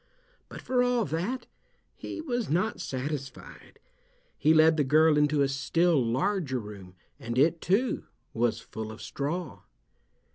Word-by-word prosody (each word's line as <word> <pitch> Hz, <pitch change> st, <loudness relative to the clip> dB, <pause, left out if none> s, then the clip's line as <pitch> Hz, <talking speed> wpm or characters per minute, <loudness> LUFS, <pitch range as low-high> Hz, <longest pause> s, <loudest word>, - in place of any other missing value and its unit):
But -, -, -10 dB
for 255 Hz, -1 st, +1 dB
all 245 Hz, -2 st, +2 dB
that 190 Hz, +12 st, -3 dB, 0.5 s
he -, -, -6 dB
was 245 Hz, -7 st, -2 dB
not 180 Hz, +8 st, 0 dB
satisfied. 135 Hz, +1 st, -6 dB, 0.6 s
He 155 Hz, -, +3 dB
led 160 Hz, 0 st, +6 dB
the 150 Hz, -, +2 dB
girl 155 Hz, +3 st, +4 dB
into 150 Hz, -1 st, +3 dB
a -, -, +2 dB
still 145 Hz, +3 st, +2 dB
larger 140 Hz, -, 0 dB
room, 100 Hz, -5 st, -9 dB, 0.2 s
and 115 Hz, +1 st, -5 dB
it, 165 Hz, +5 st, +3 dB
too, 210 Hz, +8 st, 0 dB, 0.3 s
was 115 Hz, -1 st, 0 dB
full 110 Hz, 0 st, -7 dB
of 110 Hz, -, -10 dB
straw. 145 Hz, -, -4 dB
150 Hz, 140 wpm, -28 LUFS, 130-180 Hz, 0.6 s, led